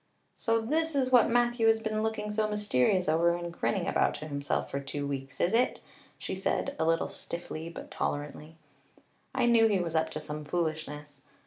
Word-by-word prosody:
"So 230 -1 +1
this 310 +7 0
is 260 -2 +1
what 250 -2 +6
Matthew 240 -1 +3
has 225 0 +5
been 215 -1 -2
looking 215 -1 -2
so 215 0 +1
mysterious 190 -4 +1
over 170 +2 +3
and 175 0 -5
grinning 185 0 -1
about - - +2
to 155 - -7
himself 140 -1 -2
for 140 - -1
two 140 +1 -4
weeks, 135 -1 -5
is 175 - +2
it?" 240 +2 +2 0.4
she - - -5
said 190 0 -1
a 160 - +2
little 165 0 +2
stiffly 170 -1 -6
but 170 - -9
tolerantly. 150 +2 -4 0.8
"I 255 - +3
knew 230 -1 +6
he 205 -3 +2
was 170 -3 -2
up 160 0 +1
to 155 - -5
some 150 0 -6
foolishness. 150 -3 -3
175 Hz, 190 wpm, -30 LUFS, 150-225 Hz, 0.8 s, what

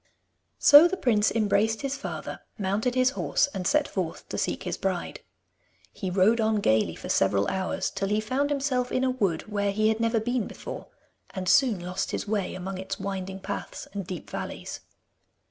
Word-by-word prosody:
So 295 +4 +9
the 380 +2 -3
prince 220 - +3
embraced 215 +1 +1
his 275 0 -1
father, - - -6 0.2
mounted 210 +5 0
his 255 0 +4
horse, - - +1
and 185 -2 -2
set 300 0 +3
forth 180 -4 -4
to - - -4
seek - - -2
his - - -2
bride. - - -3 0.7
He 190 - -4
rode 200 +5 +3
on 220 0 +2
gaily 110 - +2
for - - -8
several 100 +1 +2
hours, 190 -1 -2
till 195 - -2
he 210 +2 +1
found 260 +6 0
himself 270 -3 0
in 255 - +1
a 260 - +2
wood 195 -10 0
where 205 -1 -1
he 215 +2 +2
had 220 0 0
never 230 0 +2
been 245 +1 -1
before, - - -8 0.5
and 185 -1 -4
soon 245 -3 +4
lost 180 +2 -2
his - - -3
way 205 -3 -1
among 185 +1 -5
its 190 +1 -5
winding 190 -1 -4
paths 200 - -6
and 200 -3 -5
deep 180 -5 -6
valleys. - - -5
210 Hz, 185 wpm, -27 LUFS, 190-245 Hz, 0.7 s, So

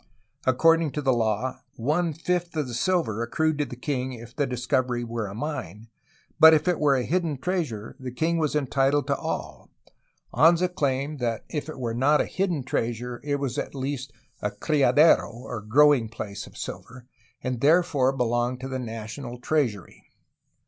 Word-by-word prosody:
According 165 +3 +4
to 150 - -2
law, 120 -1 0
one 155 +8 0
fifth 175 +1 -2
of 150 -3 0
the 120 - -6
silver 125 - 0
accrued 155 +6 0
to 145 - +1
the 125 - -8
king 130 0 -3
if 115 -1 -11
the 145 - 0
discovery 125 -1 -1
were 115 -2 -3
a 100 - -8
mine, 110 - -5 0.5
but 160 0 +9
if 155 - 0
it 180 -2 +2
were 145 -2 +4
a 130 - 0
hidden 165 -2 -1
treasure 140 - -3
the 130 -1 -5
king 160 +7 0
was 155 -2 0
entitled 140 0 +1
to 140 0 +1
all. - - -5 0.6
Anza 170 +6 +4
claimed 140 -1 -1
that 115 -3 -2
if 150 -1 -3
it 155 - -7
were 120 -3 -2
not 140 +5 +3
a - - +2
hidden 180 -7 -1
treasure, 120 -1 -3
it 145 0 0
was 140 -3 -2
at - - -5
least 135 -2 -4 0.3
a 105 - 0
^^criadero/' 145 +6 +3
or 120 -2 -6
growing 130 +1 +4
place, 105 -3 -6
of - - -15
silver, 125 +1 -8 0.4
and 125 -2 -3
therefore 150 -4 +4
be 135 -2 0
longed 120 +1 0
to 130 - -4
the 130 -1 -3
national 120 +2 -6
treasury. 120 - -2
130 Hz, 175 wpm, -26 LUFS, 120-150 Hz, 0.6 s, but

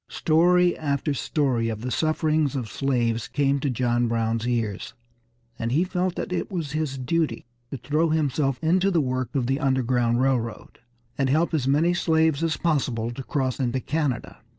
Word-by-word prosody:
Story 175 +2 +3
after 145 -1 -1
story 130 -4 0
of 110 -1 -4
the 125 +1 -4
sufferings 155 -1 +1
of 120 -6 -4
slaves 120 -4 0
came 140 -1 +1
to 140 - -1
John 120 -1 +1
Brown's 115 0 -1
ears, 115 -5 -2 0.6
and 115 +1 -2
he 155 +7 +3
felt 180 -1 -1
that - - -4
it - - -2
was 165 -6 -3
his 150 -3 -2
duty 155 +4 -1 0.2
to 140 - -5
throw 150 +7 0
himself 145 -3 0
into 180 +4 +3
the 175 -4 +2
work 130 -3 -2
of 130 -3 +1
the 135 +3 0
Underground 125 -4 +1
Railroad, 125 -4 -1 0.4
and 135 -1 +2
help 160 +5 +1
as 140 -5 0
many 155 +6 +3
slaves 160 -3 +2
as 165 -2 0
possible 130 -8 0
to 120 - -7
cross 130 -1 -2
into 130 0 0
Canada. 145 -3 -2
135 Hz, 175 wpm, -24 LUFS, 125-160 Hz, 0.6 s, Story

